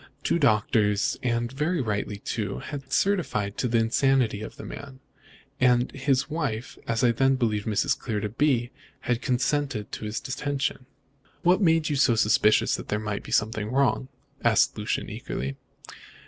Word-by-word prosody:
Two 170 - +1
doctors 105 -4 +2
and 120 -1 -1
very 150 +6 -1
rightly, 105 -4 -2
too 100 -1 -3
had 140 -3 -7
certified 160 - 0
to 125 - +1
the 115 0 +1
insanity 115 -1 +2
of 110 - -7
the - - -8
man; 140 -2 -9 0.6
and 125 0 +3
his 135 -1 0
wife 145 -7 -3
as 115 +2 0
I 120 - +5
then 135 +3 +3
believed 110 -5 -1
Mrs. 110 +6 +1
Clear 110 -4 -2
to 105 0 -3
be 120 0 +1 0.3
had 120 0 -1
consented 130 -3 -1
to - - -6
his 105 +1 -3
detention." 135 -1 -3 0.6
"What 180 +4 +4
made 165 -3 +3
you 145 - 0
suspicious 110 -5 +3
that - - -8
there 105 - 0
might 105 -1 -3
be - - -11
something 105 0 0
wrong?" 130 -1 +1 0.4
asked - - +3
Lucian - - -2
eagerly. 70 +2 -5
120 Hz, 160 wpm, -26 LUFS, 110-140 Hz, 0.6 s, I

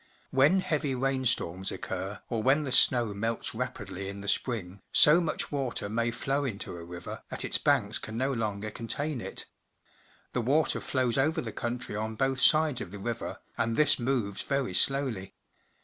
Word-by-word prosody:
Wlien 145 +8 +4
heavy 150 -5 -1
rainstorms 125 -9 0
occur, 95 +2 -5
or 115 -3 -2
when 135 +6 +3
the 135 - -4
snow 120 -5 +6
melts 115 +3 -2
rapidly 100 -5 -5
in 100 0 -7
the 100 - -8
spring, 100 -5 -1
so 155 +4 +6
much 165 - -2
water 130 -7 -2
may 115 +2 0
flow 135 +5 -1
into 105 -8 -4
a 85 - -8
river 85 +1 -8
that - - -2
its - - +1
banks 120 -8 +2
can 110 +1 -7
no 135 +3 0
longer 110 -2 -3
contain 130 +5 -3
it. - - -5 0.9
The 125 - 0
water 145 +7 +2
flows 130 -1 0
over 155 +5 +2
the - - -4
country 120 -3 -4
on 110 +1 -3
both 135 +1 0
sides 155 -4 +5
of 90 - -5
the 100 - -8
river, 115 +3 -5 0.2
and 115 0 +1
this 150 +1 +6
moves 120 -5 -1
very 135 -8 -1
slowly. 125 -3 +1
120 Hz, 175 wpm, -29 LUFS, 105-135 Hz, 0.9 s, snow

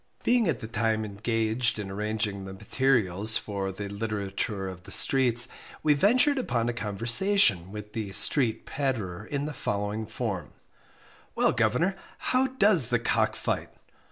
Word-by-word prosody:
Being 240 -4 +2
at 145 -9 -1
the 110 - -6
time 110 -1 -1
engaged 115 +3 -1
in 100 -2 -6
arranging 105 -1 -3
the 95 - -8
materials 110 -2 +2
for 100 -2 -4
THE 100 +2 -7
LITERATURE 100 -1 -4
OF 95 -1 -8
THE - - -13
STREETS, 125 -3 +3 0.4
we 150 - +4
ventured 255 - +3
upon 120 - -1
a 120 - -1
conversation 115 - +3
with 105 0 -9
the 105 -3 -4
"street 110 +3 +4
patterer" 115 -11 -3
in 145 -1 -3
the 150 - -5
following 105 -2 -3
form: - - -5 0.8
"Well, - - +2
governor, 140 - 0 0.2
how 265 -5 0
does 210 - +3
the - - +1
cock - - 0
fight?" - - -3
110 Hz, 150 wpm, -27 LUFS, 100-135 Hz, 0.8 s, we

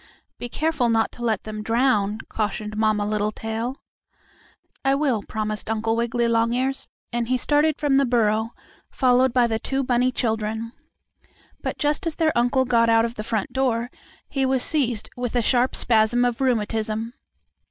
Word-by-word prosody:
"Be 245 - -5
careful 300 -3 0
not 225 -1 +2
to - - -13
let 225 -4 0
them 215 -1 -6
drown," 220 -2 +1
cautioned 215 0 -3
Mamma 215 -1 +1
Littletail. 220 +3 -2 1.1
"I 270 0 +3
will," 275 -7 +1
promised 215 0 -4
Uncle 225 0 0
Wiggily 235 0 0
Longears, 235 +4 0 0.3
and 235 -1 -1
he 255 +1 +1
started 295 +4 +2
from 285 -2 +2
the 275 - +4
burrow, 225 -2 +1 0.3
followed 255 0 +3
by 245 0 +3
the 225 -1 -1
two 270 +4 -2
bunny 250 0 +2
children. 220 -1 -2 0.9
But, - - -3
just 295 +3 0
as 320 - -2
their 315 -1 +1
uncle 245 +2 +2
got 230 -2 +3
out 225 0 +4
of 230 - -4
the 215 - -6
front 220 -2 -2
door 245 -2 0 0.4
he 270 -1 -1
was 260 -1 +1
seized 245 -8 0
with 245 -1 -4
a 240 - +3
sharp 250 +2 +2
spasm 235 +1 +3
of 245 +1 -1
rheumatism. 225 -2 -1
235 Hz, 165 wpm, -23 LUFS, 220-255 Hz, 1.1 s, the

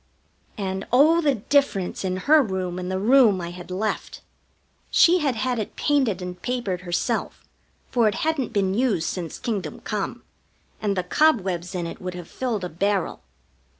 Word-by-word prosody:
And 190 -1 -3
oh, 310 +7 +5
the 285 -4 +2
difference 220 -6 0
in 185 -1 -1
her 310 +1 +7
room 185 -6 -3
and 180 0 -4
the 190 - -1
room 220 -1 +5
I 170 -1 -5
had 180 0 -10
left! 205 +4 -3 0.7
She 355 +2 +5
had 280 -6 0
had 250 +1 -1
it 215 - -5
painted 255 -11 +1
and 180 0 -7
papered 235 -8 -2
herself, 175 -1 -2 0.4
for 235 -3 +3
it 205 - +1
hadn't 315 -6 0
been 195 -2 +1
used 210 -7 +1
since 170 -4 -4
kingdom 210 -6 -4
come, - - -4 0.6
and 200 -2 0
the 185 - +1
cobwebs 185 - +1
in 175 -1 -2
it 165 - -7
would 180 -1 -5
have 175 -2 -8
filled 235 -7 -3
a - - -1
barrel. 195 +3 -1
200 Hz, 170 wpm, -24 LUFS, 180-255 Hz, 0.7 s, her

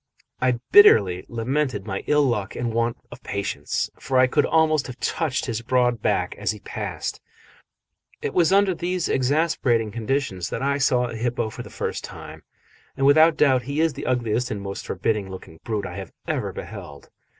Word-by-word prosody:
I 130 0 +3 0.2
bitterly 100 - +6
lamented 125 -2 -1
my 95 -2 -4
ill 150 0 +4
luck 110 -8 -1
and 120 -2 -2
want 115 +1 0
of - - -11
patience, 100 -1 -3
for 130 0 -1
I 130 - +7
could 125 - +2
almost 155 -3 +2
have 125 0 -9
touched 155 -5 -1
his 115 -2 -3
broad 120 -1 +1
back - - 0
as - - -1
he - - -2
passed. - - -5 1.0
It - - -4
was 175 -1 +3
under 195 -1 +4
these 175 +1 -2
exasperating 130 -5 +1
conditions 110 -5 -2
that - - -4
I 140 +1 +1
saw 125 -3 +3
a 115 - -6
hippo 115 -1 -2
for - - -8
the - - -9
first - - -4
time, - - -9 0.6
and 135 - +1
without 155 +3 +6
doubt 135 -4 +4
he 145 +2 -1
is 160 -1 +2
the - - -6
ugliest 125 -1 0
and 105 - -3
most 100 0 -6
forbidding 100 +1 -1
looking 90 -4 -10
brute 105 -4 -2
I 95 +1 -7
have 95 -3 -7 0.2
ever - - -1
beheld. 70 -1 -9
125 Hz, 185 wpm, -23 LUFS, 110-145 Hz, 1.0 s, I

